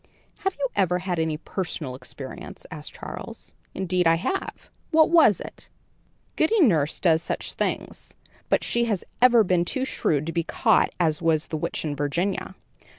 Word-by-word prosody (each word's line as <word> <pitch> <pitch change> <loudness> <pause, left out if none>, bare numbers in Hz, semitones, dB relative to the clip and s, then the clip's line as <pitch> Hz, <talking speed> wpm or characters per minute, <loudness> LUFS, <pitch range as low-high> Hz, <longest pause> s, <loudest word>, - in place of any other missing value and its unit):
"Have 385 0 -1
you 280 -1 0
ever 180 -3 +2
had 180 -1 -2
any 160 -1 0
personal 160 -5 -4
experience?" 130 +1 -9
asked 150 -2 -8
Charles. - - -9 0.2
"Indeed 180 -2 +1
I 165 - +5
have." 375 - -4 0.2
"What 320 0 +4
was 320 - +6
it?" - - -10 0.7
"Goody 425 +8 +2
Nurse 160 - +3
does 165 -3 +3
such - - -3
things; - - -4 0.3
but - - +2
she 235 0 +1
has 210 -6 -2 0.2
ever 240 -2 +7
been 180 -3 +2
too 260 +9 -2
shrewd 155 - 0
to 165 - -3
be 170 0 0
caught - - +2
as 160 -3 +1
was 160 -2 +1
the 160 - -2
witch 165 +1 -3
in 145 -2 -2
Virginia." 170 +7 -2
175 Hz, 165 wpm, -25 LUFS, 155-220 Hz, 0.7 s, ever